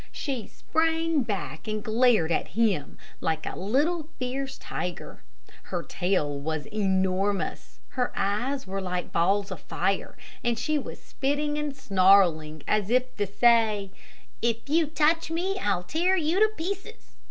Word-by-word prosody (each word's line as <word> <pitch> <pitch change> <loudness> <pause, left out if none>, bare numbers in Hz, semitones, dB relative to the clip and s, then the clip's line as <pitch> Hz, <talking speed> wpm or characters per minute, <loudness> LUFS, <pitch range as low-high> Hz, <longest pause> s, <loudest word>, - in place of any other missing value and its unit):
She 265 -7 -4
sprang 325 -1 +1
back 160 - -4
and 215 -1 -2
glared 220 -7 +3
at 180 - -2
him 200 -11 +1 0.2
like 160 -1 -1
a - - -4
little, 300 - 0
fierce 265 +1 -3
tiger. 180 - -5 0.4
Her - - -3
tail 150 -6 -1
was 155 +1 -3
enormous. 190 -1 -1
Her 250 -2 -1
eyes 245 +8 -1
were 195 +1 -3
like 180 -1 -3
balls 195 +4 +2
of 185 - -6
fire, 195 0 -2 0.3
and 240 -1 +1
she 305 +5 0
was - - -7
spitting 290 +2 -1
and 295 -2 -3
snarling, 185 - +3
as 210 -2 +1
if 255 +1 +1
to 205 -1 0
say, 215 -2 +3 0.5
"If 230 +1 -1
you 315 +2 +3
touch 320 +2 +2
me, 370 +4 -1
I'll 190 - 0
tear 350 - +1
you 330 +3 +1
to 435 - +6
pieces!" 395 +6 -6
225 Hz, 145 wpm, -27 LUFS, 190-295 Hz, 0.5 s, to